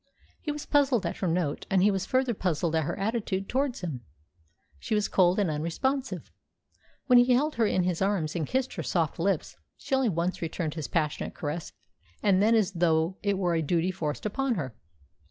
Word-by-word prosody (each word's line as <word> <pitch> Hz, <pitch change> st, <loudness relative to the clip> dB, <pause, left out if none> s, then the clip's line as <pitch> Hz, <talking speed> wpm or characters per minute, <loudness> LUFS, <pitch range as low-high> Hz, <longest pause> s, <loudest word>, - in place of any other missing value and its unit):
He 300 Hz, -, -2 dB
was 295 Hz, 0 st, -6 dB
puzzled 275 Hz, -8 st, +2 dB
at 170 Hz, -, -3 dB
her 190 Hz, -, -1 dB
note, 165 Hz, -4 st, -1 dB
and 190 Hz, -2 st, +3 dB
he 205 Hz, -, +5 dB
was 195 Hz, -2 st, -2 dB
further 260 Hz, -1 st, +1 dB
puzzled 170 Hz, -4 st, -1 dB
at 160 Hz, -2 st, +1 dB
her -, -, -3 dB
attitude 200 Hz, -2 st, -2 dB
towards 265 Hz, -1 st, -1 dB
him. 155 Hz, -9 st, -4 dB, 0.8 s
She 215 Hz, -, -1 dB
was 210 Hz, -1 st, +1 dB
cold 180 Hz, -1 st, +3 dB
and 205 Hz, -3 st, +2 dB
unresponsive. 255 Hz, -, -2 dB, 0.7 s
When 250 Hz, -2 st, +7 dB
he 245 Hz, +1 st, +5 dB
held 295 Hz, +5 st, +2 dB
her 225 Hz, -2 st, +3 dB
in 185 Hz, -, +1 dB
his 180 Hz, -1 st, -1 dB
arms 190 Hz, -6 st, 0 dB
and 160 Hz, -4 st, -1 dB
kissed 260 Hz, 0 st, -1 dB
her -, -, -4 dB
soft 165 Hz, -3 st, -1 dB
lips, 185 Hz, -1 st, -1 dB, 0.2 s
she -, -, -6 dB
only 265 Hz, -3 st, +3 dB
once 175 Hz, 0 st, -1 dB
returned 165 Hz, -1 st, -3 dB
his 155 Hz, -3 st, -4 dB
passionate 155 Hz, -3 st, -1 dB
caress, 155 Hz, +2 st, -4 dB, 0.5 s
and 195 Hz, -2 st, +4 dB
then 225 Hz, +3 st, +4 dB
as 210 Hz, -3 st, +2 dB
though 170 Hz, 0 st, +1 dB
it 200 Hz, -2 st, 0 dB
were 180 Hz, -3 st, +1 dB
a 165 Hz, -, +1 dB
duty 170 Hz, +4 st, +1 dB
forced 160 Hz, -3 st, -4 dB
upon 255 Hz, +4 st, 0 dB
her. 135 Hz, -, -4 dB
190 Hz, 200 wpm, -28 LUFS, 165-230 Hz, 0.8 s, When